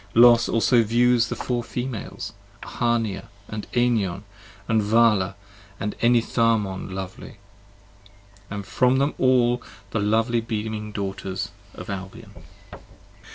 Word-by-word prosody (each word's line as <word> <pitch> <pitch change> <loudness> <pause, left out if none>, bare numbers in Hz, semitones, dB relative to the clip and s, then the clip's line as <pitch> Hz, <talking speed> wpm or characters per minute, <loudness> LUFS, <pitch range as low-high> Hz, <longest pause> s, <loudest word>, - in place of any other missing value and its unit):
Los 120 0 +7
also 115 +1 +4
views 120 +1 +3
the - - -2
Four 120 -1 -2
Females: 125 -2 -5 0.3
10 - - -9
Ahania, 115 -5 0 0.2
and 105 -1 -6
Enion, 110 -6 +1 0.4
and 110 -1 +2
Vala 105 -3 +3 0.4
and 105 - -3
Enitharmon 115 -5 +1
lovely, 95 +3 -7 1.1
And 100 -1 -5
from 125 +5 +2
them 140 +2 +1
all 125 -2 +3 0.3
the 110 - -1
lovely 115 +3 +1
beaming 110 -1 -4
Daughters 95 -2 -4 0.3
of - - -9
Albion. 95 0 -8
115 Hz, 110 wpm, -24 LUFS, 100-120 Hz, 1.1 s, Los